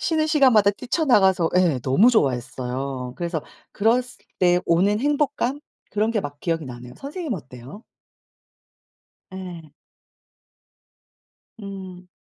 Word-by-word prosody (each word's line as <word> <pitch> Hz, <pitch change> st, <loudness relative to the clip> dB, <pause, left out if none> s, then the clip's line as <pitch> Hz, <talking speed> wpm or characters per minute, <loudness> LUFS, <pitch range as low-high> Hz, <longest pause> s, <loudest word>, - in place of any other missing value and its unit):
쉬는 315 Hz, -1 st, +1 dB
시간마다 260 Hz, -10 st, +5 dB
뛰쳐나가서 205 Hz, -, +2 dB
예 175 Hz, -8 st, +3 dB
너무 190 Hz, -, +5 dB
좋아했어요. 130 Hz, -, -2 dB
그래서 170 Hz, -3 st, -3 dB, 0.3 s
그랬을 245 Hz, +4 st, 0 dB
때 180 Hz, -1 st, +4 dB
오는 190 Hz, +5 st, +2 dB
행복감 285 Hz, 0 st, 0 dB, 0.3 s
그런 215 Hz, +2 st, +1 dB
게 220 Hz, -, 0 dB
막 145 Hz, -4 st, -7 dB
기억이 165 Hz, -2 st, -1 dB
나네요. 125 Hz, -1 st, -9 dB
선생님은 290 Hz, -, -5 dB
어때요? 130 Hz, -, -12 dB, 1.5 s
예. 175 Hz, -5 st, -9 dB, 1.9 s
음. 190 Hz, -2 st, -9 dB
185 Hz, 245 characters per minute, -23 LUFS, 145-240 Hz, 1.9 s, 시간마다